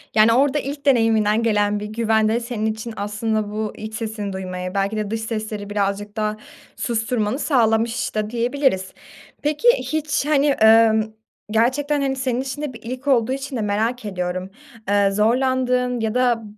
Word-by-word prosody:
Yani 220 +1 +6
orada 280 +3 +3
ilk 280 +1 -6
deneyiminden 225 -4 +3
gelen 210 -2 +1
bir 210 - -5
güven 220 0 +1
de 225 +2 +1
senin 230 -2 -4
için 220 +1 -3
aslında 210 +1 -2
bu 215 0 -3
iç 215 0 -7
sesini 215 -3 -4
duymaya, 185 -1 -5
belki 200 +2 -1
de 210 -1 -3
dış 225 0 -2
sesleri 215 -2 -4
birazcık 205 +1 -2
daha 215 0 -1 0.4
susturmanı 225 0 -1
sağlamış 230 -5 +1
da 215 0 -1
diyebiliriz. 240 -4 0 0.5
Peki, 300 +10 0
hiç, 305 -2 -1
hani, 290 -1 +3
ımm, 220 0 +5 0.4
gerçekten, 275 +6 +1
hani, 270 -1 0
senin 255 -1 -1
için 265 +2 -5
de 295 -3 -4
bir 230 - -11
ilk 255 +4 -6
olduğu 250 -3 +3
için 270 0 -4
de 230 - -1
merak 220 +3 -1
ediyorum. 185 -1 -3 0.4
Eee, 200 -1 +3
zorlandığın 250 +3 +1
ya 220 -1 -1
da 245 -3 +2
225 Hz, 165 wpm, -21 LUFS, 210-255 Hz, 0.5 s, Yani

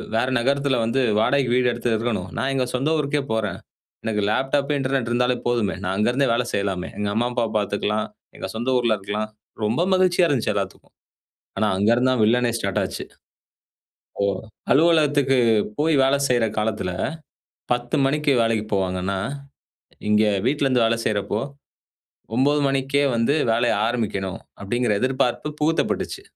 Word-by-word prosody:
வேற 115 +3 +2
நகரத்துல 140 +1 +1
வந்து 115 +4 +1 0.2
வாடகைக்கு 125 +2 +2
வீடு 125 -1 +3
எடுத்து 120 0 -1
இருக்கணும். 105 -5 -2
நான் 135 - 0
எங்க 130 -2 0
சொந்த 135 +4 0
ஊருக்கே 145 0 0
போறேன். 110 -2 -2 0.5
எனக்கு 110 -2 0
லேப்டாப், 135 +5 0
இன்டர்நெட் 135 -3 -1
இருந்தாலே 125 +1 +1
போதுமே. 115 -7 0
நான் 95 - -1
அங்கிருந்தே 125 +6 +2
வேலை 120 +1 0
செய்யலாமே! 100 -3 -1
எங்க 105 0 -1
அம்மா, 120 +2 +1
அப்பாவ 120 -3 -1
பார்த்துக்கலாம். 105 +1 -1 0.3
எங்க - - -5
சொந்த 120 +3 -2
ஊர்ல 115 -2 +2
இருக்கலாம்." 105 +2 -3 0.4
ரொம்ப 110 +9 0
மகிழ்ச்சியா 180 -1 +3
இருந்துச்சு 120 -7 0
எல்லாத்துக்கும். 100 -2 -5 0.6
ஆனா, 110 - +2
அங்க 100 +3 +2
இருந்துதான் 130 -1 +2
வில்லனே 120 +2 +3
ஸ்டார்ட் 100 -4 -1
ஆச்சு. - - -5 1.2
ஓ! - - +3 0.5
அலுவலகத்துக்கு 145 -4 +3 0.4
போய் 155 +1 +3
வேலை 135 +1 +3
செய்ற 120 -2 +3
காலத்துல 105 -4 -1 0.8
10:00 120 0 -1
மணிக்கு 150 +1 +1
வேலைக்கு 115 -2 0
போவாங்கன்னா, 95 0 -1 0.9
இங்க 105 +1 +4 0.2
வீட்ல 145 -1 +1
இருந்து 125 -3 +3
வேலை 115 +1 +1
செய்றப்போ 105 0 -1 1.0
9:00 145 +4 +3
மணிக்கே 135 +1 +1
வந்து 115 +4 +2 0.2
வேலைய 120 +1 +2
ஆரம்பிக்கணும் 100 -5 -2 0.2
அப்படிங்கிற 120 +3 0
எதிர்பார்ப்பு 130 +2 0
புகுத்தப்பட்டுச்சு. 160 +2 0
120 Hz, 140 wpm, -22 LUFS, 105-135 Hz, 1.2 s, இங்க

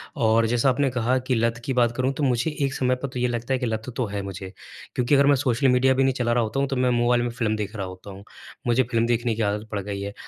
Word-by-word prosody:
और 115 0 +3
जैसा 120 +3 +2
आपने 135 +2 +1
कहा 125 +1 +1
कि 130 - +2
लत 115 0 +1
की 135 - -1
बात 120 -2 +2
करूँ, 130 +1 +1
तो 145 - -3
मुझे 130 +4 0
एक 135 - -2
समय 130 -1 +1
पर 125 +2 -5
तो 125 -1 -6
ये 125 - +2
लगता 120 +1 -2
है 130 - 0
कि 125 - -2
लत 110 +1 -3
तो 125 - 0
है 100 0 -4
मुझे, 95 0 -7 0.4
क्योंकि 125 +3 +2
अगर 140 0 +5
मैं 145 - +6
सोशल 130 0 +1
मीडिया 130 +1 +4
भी 135 +1 +2
नहीं 135 0 +2
चला 120 -2 -1
रहा 120 0 +2
होता 110 +4 -2
हूँ, 140 - +1
तो 135 - -3
मैं 125 0 +2
मोबाइल 120 0 +2
में 120 - -1
फ़िल्म 115 -2 -1
देख 105 0 -5
रहा 100 -3 -3
होता 95 +2 -10
हूँ। 95 +1 -11 0.4
मुझे 120 +2 +3
फ़िल्म 115 -1 0
देखने 120 -1 0
की 115 - -3
आदत 105 +1 -1
पड़ 105 - -2
गई 100 0 -5
है। 100 0 -5
120 Hz, 300 wpm, -24 LUFS, 110-130 Hz, 0.4 s, मैं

